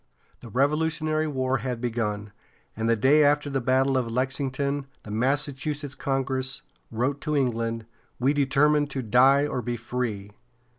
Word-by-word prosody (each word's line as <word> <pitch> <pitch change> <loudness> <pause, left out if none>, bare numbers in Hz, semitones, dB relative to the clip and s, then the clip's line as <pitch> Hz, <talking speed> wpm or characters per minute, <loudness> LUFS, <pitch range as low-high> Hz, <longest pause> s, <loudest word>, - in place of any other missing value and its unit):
The 120 - -11
Revolutionary 155 +4 +1
War 130 -2 0
had 125 -3 -3
begun, 105 -4 -2 0.4
and 115 +1 -1
the 115 - +4
day 140 +7 +5
after 145 0 +2
the 135 -1 0
battle 130 +2 +2
of 120 -2 -3
Lexington 135 +3 -1 0.2
the 105 - -9
Massachusetts 140 +4 -1
Congress 135 +1 -2 0.3
wrote 130 +5 -1
to 150 -1 -1
England: 115 -3 -1 0.3
"We 135 +3 +3
determine 145 +1 +3
to 135 -2 -4
die 130 +6 +5
or 130 -4 -2
be 120 0 -3
free." 110 -4 -4
135 Hz, 145 wpm, -26 LUFS, 120-145 Hz, 0.4 s, day